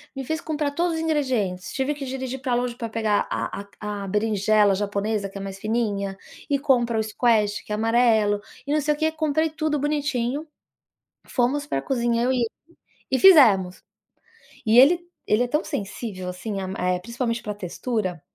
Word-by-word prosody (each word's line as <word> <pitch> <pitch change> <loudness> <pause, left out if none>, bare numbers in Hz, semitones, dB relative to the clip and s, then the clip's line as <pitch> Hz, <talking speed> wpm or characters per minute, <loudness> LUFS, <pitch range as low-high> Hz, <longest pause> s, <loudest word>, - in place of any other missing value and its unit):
Me 270 - -4
fez 315 +4 -2
comprar 305 -3 -2
todos 340 +3 0
os 320 - -2
ingredientes. 255 - -1
Tive 275 +2 -1
que 280 -1 -6
dirigir 260 0 -4
pra 255 -1 -2
longe 245 0 0
pra 230 -1 -4
pegar 220 -2 0
a 200 - -3 0.2
a 205 -1 -4
a - - -6
berinjela 210 0 +2
japonesa, 205 +1 -1
que 195 0 -10
é - - -6
mais 195 -1 -6
fininha, 205 -2 -1 0.3
e 280 -1 +2
compra 240 -5 +2
o - - +1
squash, 215 -2 +1
que - - -10
é - - +1
amarelo, 220 -2 +3 0.3
e - - -2
não 305 - +3
sei 300 +1 +1
o - - -7
quê, 315 0 +1
comprei 315 0 0
tudo 310 -1 -1
bonitinho, 290 -1 -1 0.8
fomos 275 +4 0
pra 135 - -2
cozinha 235 -2 0
eu 255 - +2
e 260 - 0
ele 240 - +1 0.7
e 260 - +2
fizemos. 215 - +6 0.8
E 225 +3 +5
ele 335 +6 +6 0.2
ele 215 +4 +2
é 245 - -4
tão 300 +5 +1
sensível 195 -2 -5
assim 195 +3 -5
a 190 - -3 0.2
é 180 - +2
é - - -4
principalmente 235 +3 -3
pra 210 -1 -4
textura, 190 -1 -3
235 Hz, 190 wpm, -24 LUFS, 205-280 Hz, 0.8 s, fizemos